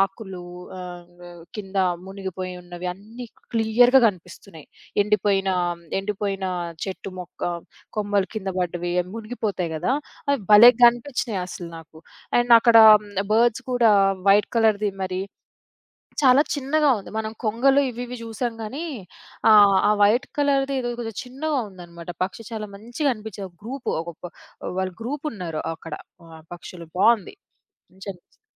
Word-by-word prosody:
ఆకులు, 190 -2 -2 0.4
ఆహ్, 175 0 -11 0.4
కింద 195 -1 -7 0.3
మునిగిపోయి 190 -2 -6
ఉన్నవి 175 0 -6
అన్నీ 225 +6 -11 0.3
క్లియర్‌గా 240 +4 +5
కనిపిస్తున్నాయి. 180 -3 -10 0.4
ఎండిపోయిన 200 -2 +1 0.5
ఎండిపోయిన 200 -1 -3 0.4
చెట్టు 190 0 -6
మొక్క, 180 0 -10 0.6
కొమ్మలు 205 -2 0
కింద 195 -2 -3
పడ్డవి 175 0 -2
అవి 180 - -13
మునిగిపోతాయి 210 -6 -3
గదా! 240 +11 0 0.4
అవి 280 - +1
భలే 225 +4 +10
గనిపిచ్చినాయి. 240 -3 +2
అసలు 175 -1 -7
నాకు. 160 -1 -15 0.4
అండ్ 240 -1 +5
అక్కడ 235 -1 +5 0.6
బర్డ్స్ 235 +2 +2
కూడా 235 -3 +4 0.4
వైట్ 205 +1 +4
కలర్‌ది 215 -2 +2
మరి. 185 0 -3 1.0
చాలా 270 +1 +6
చిన్నగా 290 +2 +1
ఉంది. 195 - -10
మనం 220 0 -3
కొంగలు 260 +6 +3
ఇవి 245 0 -6
ఇవి 250 +1 -7
జూసాం 230 +1 -4
గాని, 265 +9 -5 0.7
ఆహ్, 205 -2 +7
ఆ - - +4
వైట్ 230 +7 +4
కలర్‌ది 275 -1 +2
ఏదో 240 - -3
కొది 225 -1 -5
చిన్నగా 275 +3 -3
ఉందన్నమాట. 175 -2 -11
పక్షి 195 +4 -8
చాలా 215 -2 -5
మంచిగా 240 +8 -2
అనిపిచ్చింది. 210 -3 -8
ఒక 175 - -31
గ్రూపు 255 +2 -6
ఒకక 170 +1 -9 0.5
వాళ్ళు 190 -1 -2
గ్రూపున్నారు. 230 - -4
అక్కడ 165 0 -8 0.3
ఆహ్, 160 -1 -13
పక్షులు 170 -1 -11
బావుంది. 220 0 +3 0.6
మంచిగ 195 +1 -7
అనిపిచ్చింది. 175 - -27
210 Hz, 130 wpm, -23 LUFS, 185-240 Hz, 1.0 s, భలే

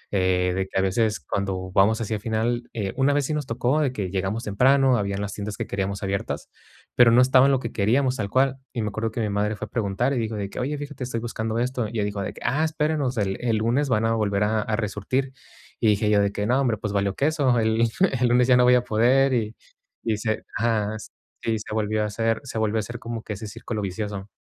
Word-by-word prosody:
Eh, 90 -1 +2
de 95 +1 -1
que - - -5
a - - +4
veces 105 0 +1
cuando 95 +4 -3
vamos 100 +4 +3
hacia 110 -1 -2
el - - -11
final 115 +2 -1
eh, 100 -4 -3
una 135 +1 +3
vez 145 -1 +1
sí 155 - -2
nos 150 -3 -2
tocó 125 +5 +1
de 145 -4 +1
que 100 -7 -4
llegamos 95 +4 -2
temprano, 130 +5 +4
habían 100 -2 -1
las 100 -1 -4
tiendas 105 0 -5
que - - -3
queríamos 100 0 -3
abiertas, 95 0 -3 0.4
pero 120 -1 +6
no 115 +2 +5
estaban 130 +1 +5
lo 135 -2 +3
que 115 -3 -5
queríamos 125 +5 +1
tal 100 -2 -3
cual. 130 +3 +2
Y 115 - -2
me 105 - -1
acuerdo 110 +2 -2
que 115 +2 -4
mi 105 - -1
madre 105 +1 0
fue 110 - -5
a - - -16
preguntar 115 +3 0
y 130 - 0
dijo 110 -1 -2
de 100 -1 -4
que: - - -6
"Oye, 145 +4 -2
fíjate, 145 -2 -6
estoy 120 -2 -3
buscando 115 -1 -3
esto", 125 -1 -1
y - - -9
ella 110 -3 0
dijo 100 0 -3
de 95 - -3
que: - - -13
"Ah, 145 +6 +1
espérenos, 150 -5 0
el 95 -2 0
el 120 -2 +1
lunes 120 +6 +1
van 115 -2 +2
a 115 - +2
volver 105 -2 +1
a 110 +1 +1
a 105 +1 -1
resurtir". 115 +5 -2 0.5
Y 115 - +2
dije 105 0 +3
yo 105 -1 +4
de 100 0 +1
que: 105 0 -2
"No 125 +4 +2
hombre, 120 -5 +1
pues, 105 -1 -4
valió 100 -1 0
queso, 140 -4 +2
el 110 +1 +2 0.3
el 125 - +4
lunes 120 +1 +3
ya 130 - +6
no 125 - +5
voy 125 0 +6
a 125 - +2
poder". 125 +4 +3
Y 115 -2 -1 0.5
y 110 -2 0
se 110 0 -2 0.2
ajá, 110 -2 0 0.5
y 115 -1 0
se 110 0 -7
volvió 110 0 0
a - - 0
hacer 115 +2 0
se 120 -5 -5
volvió 110 0 0
a 110 - +2
hacer 120 +3 -7
como 115 -2 -6
que 105 - -5
ese 105 +2 -7
círculo 110 0 -5
vicioso. 100 +1 -4
110 Hz, 255 wpm, -24 LUFS, 105-125 Hz, 0.5 s, pero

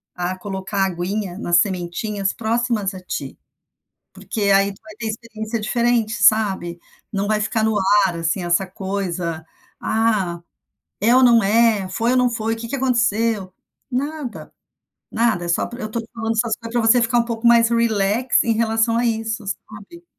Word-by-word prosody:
a 180 +1 -2
colocar 195 0 -3
aguinha 185 +1 -3
nas 175 -3 +2
sementinhas 195 +2 -2
próximas 230 -3 -1
a - - -7
ti. 180 - -6 0.8
Porque 220 - -5
aí 195 0 +3
tu - - -23
vai 215 -1 -12
ter 225 -1 -4
experiência 220 0 -5
diferente, 230 -1 0
sabe, 195 -5 +3 0.3
não 200 0 -1
vai 215 0 +1
ficar 220 +1 0
no 220 -1 +1 0.3
ar 175 - -3
assim 165 +2 -1
essa 175 +2 +1
coisa. 180 -4 -4 0.4
Ah, 215 -6 0 0.6
é 230 +4 +4
ou 260 - +6
não 235 -3 +6
é? 215 -1 +3
Foi 230 +6 0
ou 255 - +3
não 250 -1 +3
foi? 225 -1 -2
O 225 - -5
que 230 - -6
que - - -2
aconteceu? 230 -6 0 0.4
Nada 280 +1 -4 0.6
nada 225 -7 +1
é - - -5
só 170 - +1
para 240 +2 -9
eu - - -2
estou 230 +2 -3
te 230 - -15
falando 225 -1 -2
essas 225 0 +1
coisas 230 0 -9
pra 240 - +1
você 245 +1 +5
ficar 235 +1 +2
um 235 - +2
pouco 230 0 -2
mais 235 -1 +6
relax 230 +1 +2
em 230 - +1
relação 225 +1 +1
a 240 - +1
isso, 225 -1 -2
sabe. 215 - -8
220 Hz, 180 wpm, -21 LUFS, 195-230 Hz, 0.8 s, ou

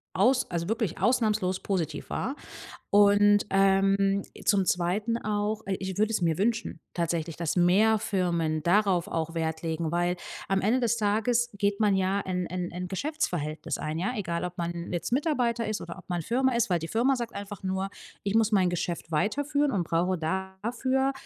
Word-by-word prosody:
aus 255 0 +3
also 170 +1 -2
wirklich 225 -5 -1
ausnahmslos 210 -5 +2
positiv 165 -7 -3
war. 270 - -2 0.5
Und, 205 0 +5
ähm, 195 0 +3 0.2
zum 195 -2 +3
2. 190 +7 0
auch, 210 0 -1
äh 195 - 0
ich 190 0 -4
würde 215 +1 +3
es 215 - 0
mir 165 -1 +1
wünschen 220 -4 0 0.2
tatsächlich, 170 -1 -1
dass 170 -3 -1
mehr 200 +5 +4
Firmen 170 -6 0
darauf 185 -1 +3
auch 165 0 -3
Wert 160 -1 -2
legen, 160 -1 -2
weil 175 +1 +1 0.3
am 195 0 +1
Ende 230 +6 +2
des 235 -1 +1
Tages 230 +3 +1
geht 200 0 0
man 210 -3 +3
ja 190 +1 +1
ein 180 -1 -2
ein 180 0 -3
ein 180 +1 -4
Geschäftsverhältnis 180 - -2
ein, 155 +1 -3
ja? 230 +9 -1
Egal, 170 -3 -2
ob 180 - -7
man 170 0 -4
jetzt 175 +5 -3
Mitarbeiter 245 -4 +1
ist 215 -1 -2
oder 170 - -7
ob 185 - -18
man 175 -2 -2
Firma 260 +7 +1
ist, 235 -4 +1
weil 175 - +3
die 165 - -5
Firma 245 +8 +2
sagt 235 -2 -5
einfach 200 0 -7
nur: 190 +1 -2 0.3
„Ich 200 - -1
muss 225 0 +3
mein 185 -4 +3
Geschäft 170 -1 -3
weiterführen 285 - +1
und 190 -7 0
brauche 180 +3 +1
dafür, 210 +11 -1
195 Hz, 180 wpm, -28 LUFS, 175-220 Hz, 0.5 s, Und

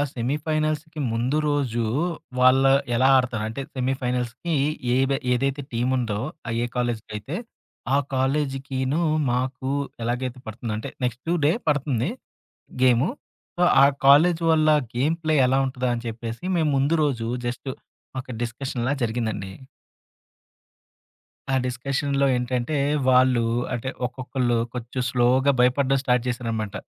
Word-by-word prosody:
సెమీఫైనల్స్‌కి 155 +4 -2
ముందు 125 +6 0
రోజు 130 -6 0 0.6
వాళ్ళ 130 +1 +6 0.3
ఎలా 130 +2 +4
ఆడతారంటే, 115 0 -2
సెమీఫైనల్స్‌కి 125 +3 -2 0.4
ఏవ 135 +1 +2 0.2
ఏదైతే 135 +3 0
టీమ్ 120 +2 0
ఉందో 110 -4 -2 0.3
ఆ - - -1
ఏ - - -1
కాలేజీకయితే. 115 +2 -3 0.6
ఆ - - +5 0.2
కాలేజీకీను 135 +1 -1 0.3
మాకు 130 +1 -2 0.3
ఎలాగైతే 125 +1 -2
పడుతుందంటే 110 0 -5
నెక్స్‌ట్ 125 +7 -2
డే 160 - +4 0.2
పడతంది 140 - +1 0.7
గేము. 125 +5 +4 0.5
సో, 180 - +2 0.2
ఆ - - +9 0.2
కాలేజీ 160 +4 +6
వల్ల 155 -1 +3 0.3
గేమ్‌ప్లే 155 +3 +1
ఎలా 135 +1 +2
ఉంటదా 125 -1 -2
అని 120 0 -5
చెప్పేసి 115 0 -6
మేముందు 145 -1 +2
రోజు 120 -6 -1 0.2
జస్ట్, 125 +2 -4 0.5
ఒక 130 - -12 0.2
డిస్కషన్‌లా 125 +2 -2
జరిగిందండి. 110 -4 -3 2.0
ఆ - - +3
డిస్కషన్‌లో 140 +2 0
ఏంటంటే, 125 +4 -1 0.3
వాళ్ళు 125 -2 +4 0.3
అంటే 130 +2 -3 0.2
ఒక్కొక్కళ్ళు 125 -1 -1 0.2
కొంచెం 125 +1 -4
స్లోగా 130 +3 +3
భయపడడం 135 +2 +2
స్టార్ట్ 125 -1 +1
చేశారనమాట. 115 -4 -3
130 Hz, 110 wpm, -24 LUFS, 120-140 Hz, 2.0 s, ఆ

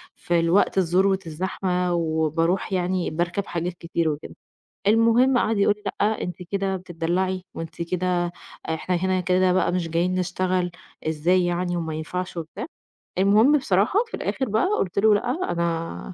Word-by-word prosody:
في 170 -1 0
الوقت 170 +4 +2
الذروة 190 +2 +3
الزحمة، 180 +2 -1
وبارُوح 165 +3 0
يعني 180 0 0
باركب 175 +4 -2
حاجات 175 +1 -3
كتيرة 170 -1 -1
وكده، 145 +1 -7 0.5
المهم 230 +4 +4
قعد 220 -2 +1
يقول 200 +1 +3
لي 210 - -22 0.2
لأ 215 +2 +1
أنتِ 180 - -4
كده 195 -1 0
بتتدلّعي، 180 +1 -2
وأنتِ 165 0 -7
كده 175 0 0 0.4
إحنا 160 +3 -1
هنا 185 +1 +1
كده 185 0 +3
بقى 185 -1 +2
مش 175 -2 -1
جايين 175 +3 +1
نشتغل، 180 0 0 0.4
إزاي 175 +4 +2
يعني 175 0 -1
وما 160 -2 -3
ينفعش 180 +3 -4
وبتاع، 160 -1 -5 0.5
المهم 215 +10 +5
بصراحة 225 - +2
في - - -24
الآخر 265 -5 -2
بقى 220 - +2
قُلت 190 +1 -1
له 215 0 +5
لأ 260 - -1
أنا 170 +1 -3
180 Hz, 155 wpm, -24 LUFS, 170-195 Hz, 0.5 s, المهم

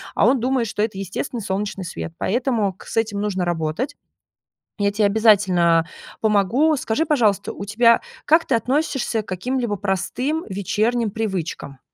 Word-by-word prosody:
а - - +3
он 265 - +3
думает, 250 -1 0
что 210 - -3
это 215 -3 -3
естественный 195 +6 -4
солнечный 195 -1 -3
свет, 165 - -6
поэтому 225 -3 0
к - - -16
с - - -7
этим 220 -2 0
нужно 190 -3 -1
работать. 175 - -2 0.8
Я 200 -1 +2
те 210 0 +1
обязательно 190 -6 +4 0.4
помогу. 220 +9 +3
Скажи, 260 +4 0
пожалуйста, 215 -9 +1
у - - -7
тебя 230 +3 +4 0.2
как 320 +2 +4
ты 265 - +1
относишься 255 -1 0
к - - -23
каким-либо 235 +4 -2
простым 250 - -2
вечерним 215 +4 0
привычкам? 180 - -4
215 Hz, 150 wpm, -21 LUFS, 195-245 Hz, 0.8 s, обязательно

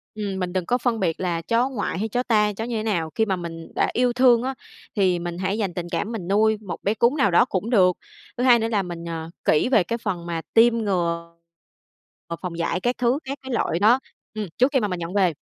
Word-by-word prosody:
ừm, 200 -3 -3
mình 180 -1 -3
đừng 185 -2 -1
có 245 - +1
phân 240 -2 -1
biệt 170 -5 -1
là 175 -3 -1
chó 230 +9 +1
ngoại 205 -8 -3
hay 220 - -1
chó 245 +4 -1
ta, 210 -4 +2
chó 220 - -5
như 235 0 -3
thế 215 - -2
nào. 175 -8 -1
Khi 220 - +2
mà 195 -3 0
mình 165 -2 -8
đã - - +2
yêu 250 0 +2
thương 245 -1 +5
á, 265 +1 -2 0.4
thì 185 -4 +2
mình 170 0 -5
hãy 190 +3 -1
dành 200 -5 -2
tình 175 0 -4
cảm 215 - -2
mình 205 -7 -5
nuôi, 215 +2 +3
một 190 -5 -8
bé 205 - +1
cún 235 +5 +2
nào 205 -9 +3
đó 175 +8 +5
cũng 210 -2 -3
được. 185 -7 +4 0.4
Thứ 245 - -1
hai 245 -2 +6
nữa 225 - 0
là 210 -4 0
mình, 170 -2 -7
ờ, 165 -1 -5 0.2
kỹ 155 +10 +3
về 220 -8 +4
cái 230 +7 -3
phần 190 -7 -4
mà 170 -1 -3
tiêm 230 +1 +5
ngừa 170 -5 -1 0.9
và 170 - -3
phòng 175 -3 -5
dại 170 +1 -1
các 245 +6 -1
thứ, 245 +3 +2
các 275 +1 -5
cái 265 - -6
loại 170 -7 0
đó, 225 +6 +5 0.3
ừm, 215 -2 -4
trước 255 +3 +3
khi 265 - +4
mà 210 - 0
mình 180 -3 -4
nhận 170 +1 -5
về. 190 -4 +3
205 Hz, 260 wpm, -23 LUFS, 175-235 Hz, 0.9 s, hai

